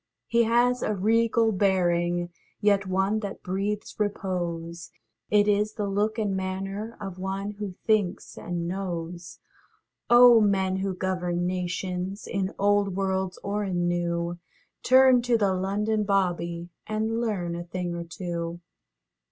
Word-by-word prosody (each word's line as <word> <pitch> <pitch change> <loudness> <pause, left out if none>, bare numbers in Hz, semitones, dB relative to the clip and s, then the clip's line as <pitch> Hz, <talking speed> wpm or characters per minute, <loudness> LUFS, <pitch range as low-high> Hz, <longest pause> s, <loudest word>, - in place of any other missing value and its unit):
He 235 0 +3
has 245 +2 +3
a 215 - 0
regal 225 +3 +2
bearing, 175 -3 +1 0.3
Yet 205 -2 +2
one 190 +3 +1
that 200 -2 -6
breathes 200 +4 -3
repose; 175 -5 -3 0.4
It 210 0 +4
is 210 +1 +2
the 210 - -3
look 205 +3 0
and 205 -3 0
manner 195 +4 -4
Of 195 -3 -7
one 195 +2 -3
who 200 -3 -5
thinks 215 -5 0
and 170 -1 -4
knows. 175 -2 -5 0.7
Oh, 240 -1 +8
men 190 -2 +2
who 190 -1 -2
govern 180 -2 -1
nations, 185 +2 -3
In 195 -1 -2
old 200 -1 +2
worlds 190 -1 -1
or 205 +1 -1
in 175 -3 -1
new, 175 0 -1 0.4
Turn 260 -1 +6
to 240 -1 +2
the 200 -3 +2
London 210 +3 0
âBobbyâ 175 -4 -1 0.2
And 220 +1 -1
learn 185 -7 -2
a 175 - -4
thing 175 0 -4
or 170 0 -4
two. 170 0 -5
195 Hz, 135 wpm, -26 LUFS, 175-210 Hz, 0.7 s, Oh